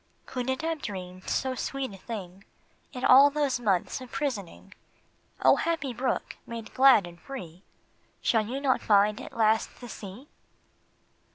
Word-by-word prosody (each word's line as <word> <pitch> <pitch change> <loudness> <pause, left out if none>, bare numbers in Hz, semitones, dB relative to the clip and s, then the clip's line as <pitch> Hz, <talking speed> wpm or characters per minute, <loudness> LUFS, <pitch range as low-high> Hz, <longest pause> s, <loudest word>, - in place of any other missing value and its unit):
Could 250 0 -4
it 260 +3 -1
have 325 -2 -2
dreamed 185 -2 -7
so 260 -1 0
sweet 265 -1 -4
a - - -10
thing 195 -3 -8 0.5
In 250 - -4
all 275 +3 +8
those 285 -3 0
months 200 +1 0
of 255 - -10
prisoning? 260 - -4 0.7
O - - +6
happy 325 -6 -1
brook! 255 +3 -2
made 230 -1 -7
glad, 260 -5 +7
made 170 -1 -11
free, 185 -11 -8 0.6
Shall 220 -2 +1
you 260 +4 -3
not 275 -2 +1
find 210 0 +3
at - - -10
last 220 0 +2
the 245 - -9
sea 215 +4 -9
240 Hz, 155 wpm, -28 LUFS, 200-270 Hz, 0.7 s, all